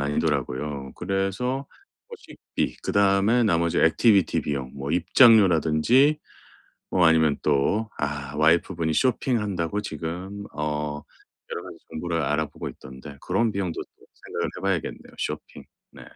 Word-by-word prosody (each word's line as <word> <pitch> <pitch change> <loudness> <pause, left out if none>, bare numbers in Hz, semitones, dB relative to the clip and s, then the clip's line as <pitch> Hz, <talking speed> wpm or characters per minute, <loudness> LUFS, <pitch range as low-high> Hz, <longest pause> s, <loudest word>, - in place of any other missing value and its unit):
아니더라고요. 70 -1 -2
그래서 95 +9 -2 0.4
뭐 470 - -9
식비 - - -5
그다음에 100 +4 +3
나머지 85 -5 +1
액티비티 100 +3 +3
비용 70 -3 -4
뭐 70 +1 -5
입장료라든지 100 - +5 0.7
뭐 90 -2 +4
아니면 80 -2 +4
또 75 +10 +1
아 75 0 -3
와이프 80 +4 +3
분이 80 -2 0
쇼핑한다고 105 - 0
지금 95 +5 -6
어 75 -1 -3 0.5
여러 - - -4
가지 - - -10
정보를 85 0 -2
알아보고 75 +1 -2
있던데 65 +2 -12
그런 110 +4 0
비용도 95 -4 -3
좀 - - -21 0.2
생각을 - - -2
해 - - -7
봐야겠네요. 95 -4 -3
쇼핑. - - -5 0.3
네 - - -13
85 Hz, 310 characters per minute, -25 LUFS, 75-100 Hz, 0.7 s, 입장료라든지